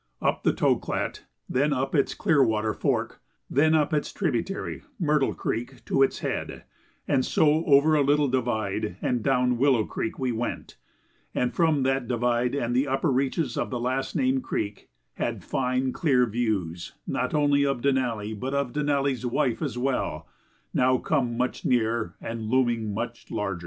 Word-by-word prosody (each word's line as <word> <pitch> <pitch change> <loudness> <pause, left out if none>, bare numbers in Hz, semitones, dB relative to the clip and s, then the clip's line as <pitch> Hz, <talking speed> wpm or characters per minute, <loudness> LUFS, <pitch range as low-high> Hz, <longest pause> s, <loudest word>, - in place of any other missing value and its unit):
Up - - 0
the - - +3
Toklat, - - -1 0.2
then 145 +4 +1
up 135 -1 -1
its 140 -4 +1
Clearwater 110 - +2
Fork, - - -1 0.3
then 155 +4 +4
up 155 -1 +2
its 150 - 0
tributary, 175 - -2 0.2
Myrtle 150 -5 +2
Creek, 120 +3 -4
to 135 - +1
its 135 - +2
head, - - -4 0.4
and 135 -3 +2
so 155 +3 +3
over 145 +2 +5
a 150 - +4
little 145 +1 +3
divide 110 -8 -1
and 120 -2 0
down 125 -1 +2
Willow 130 -5 +3
Creek, 110 - -4
we 130 -2 -1
went, 120 +1 -4 0.6
and 125 - 0
from 160 -5 +2
that 135 -1 0
divide 120 +1 +1
and 120 -3 -1
the 135 +3 +2
upper 135 +3 +1
reaches 135 +1 0
of - - -1
the 125 - -3
last 130 +2 -2
named 265 0 +2
creek 105 - -4 0.3
had - - -2
fine, 130 0 0
clear 135 -8 +3
views 105 -7 -2
not - - -1
only 145 -1 +3
of 135 -3 0
Denali 120 -6 0
but 130 +6 -3
of 140 -3 -1
Denali's 140 -3 0
Wife 130 -1 0
as 135 -7 -2
well, 125 - -1 0.5
now 130 0 +3
come 125 -5 0
much 125 +1 -1
nearer 115 -2 0
and 115 -1 -5
looming 120 -4 +1
much 100 - -5
larger. 100 -4 -2
130 Hz, 160 wpm, -26 LUFS, 120-140 Hz, 0.6 s, over